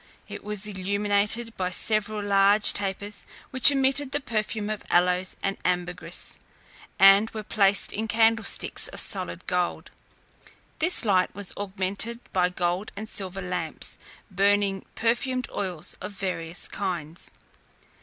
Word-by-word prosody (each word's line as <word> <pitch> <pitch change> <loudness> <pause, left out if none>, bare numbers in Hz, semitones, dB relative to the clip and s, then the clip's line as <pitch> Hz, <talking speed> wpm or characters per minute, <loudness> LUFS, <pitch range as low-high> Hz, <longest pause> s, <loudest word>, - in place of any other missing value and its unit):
It - - -8
was 210 -1 -1
illuminated 205 +3 -1
by 185 -1 -1
several 215 +2 0
large 200 +1 +5
tapers 200 +1 -4 0.3
which 260 0 +8
emitted 270 0 +2
the 290 - +1
perfume 215 -4 -2
of 215 - -4
aloes 180 +1 +2
and 195 0 -1
ambergris, 180 -1 -3 0.6
and 195 +3 +7
were 215 -1 -6
placed 200 -2 +2
in 220 +2 -2
candlesticks 225 +1 +1
of - - -4
solid 185 -2 -2
gold. 180 -1 -1 0.9
This 320 -5 0
light 185 -4 +2
was 200 -2 -4
augmented 200 +4 -1
by 180 -1 +3
gold 180 +2 -2
and 215 +2 -5
silver 195 -2 -5
lamps, 180 -3 -3 0.3
burning 200 0 +2
perfumed 250 +2 0
oils 180 -6 -4
of 210 - -6
various 180 -3 -4
kinds. 175 -4 -4
200 Hz, 125 wpm, -26 LUFS, 185-215 Hz, 0.9 s, which